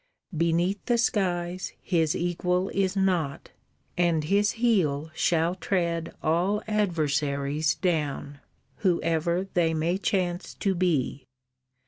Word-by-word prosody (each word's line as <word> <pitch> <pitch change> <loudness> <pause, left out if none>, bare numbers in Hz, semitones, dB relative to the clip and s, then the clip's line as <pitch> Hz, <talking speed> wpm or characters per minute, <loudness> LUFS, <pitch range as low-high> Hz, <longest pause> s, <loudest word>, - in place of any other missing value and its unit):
Beneath 170 +4 +1
the 240 - +3
skies 180 -5 -1
His 165 -4 +1
equal 180 +2 0
is 195 0 0
not, 180 -7 0 0.4
and 170 -3 +2
his 200 +6 +2
heel 165 -11 +1
Shall 165 +1 +1
tread 170 -3 -1
all 180 +6 +1
adversaries 150 -6 0
down, 150 -5 -2 0.4
Whoever 170 0 +1
they 165 -2 +2
may 170 +4 0
chance 180 -3 -1
to 195 - 0
be. 155 -7 0
175 Hz, 105 wpm, -27 LUFS, 160-190 Hz, 0.4 s, the